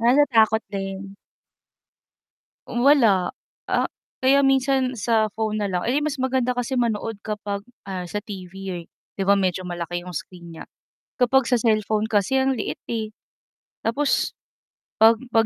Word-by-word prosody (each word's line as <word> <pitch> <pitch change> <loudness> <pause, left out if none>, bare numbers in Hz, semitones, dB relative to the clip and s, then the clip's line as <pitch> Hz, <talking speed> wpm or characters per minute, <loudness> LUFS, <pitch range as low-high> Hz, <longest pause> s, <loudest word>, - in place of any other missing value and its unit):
Ah, 235 +2 +4
natakot 225 -6 +4
din. 195 0 -5 1.6
Hmm, 240 - -2
wala. 230 -10 +5 0.4
Ah - - +2 0.3
kaya 275 +2 +4
minsan 265 -2 +2
sa 220 -1 +2
phone 215 0 -2
na 200 - -1
lang. 180 -1 -1
Eh, 270 +5 +1
mas 300 -1 -2
maganda 260 -1 +1
kasi 245 +1 -2
manood 225 -2 0
kapag, 205 -2 -4 0.2
ah, 190 -2 -4
sa 180 +4 -4
TV, 195 -4 -8 0.3
eh, - - -17 0.3
'di 195 - -3
ba 200 +1 +4
medyo 185 -1 0
malaki 175 -1 -4
'yong 180 -1 -7
screen 170 0 -8
niya? - - -8 0.5
Kapag 255 0 +3
sa 250 - +4
cellphone 215 -2 +1
kasi 215 +3 +1
ang 265 0 +2
liit, 230 - -3 0.2
eh. 220 -2 -2 0.8
Tapos 275 +5 +1 0.7
'pag 225 +1 +7 0.2
'pag 225 0 +5
220 Hz, 150 wpm, -23 LUFS, 195-255 Hz, 1.6 s, pag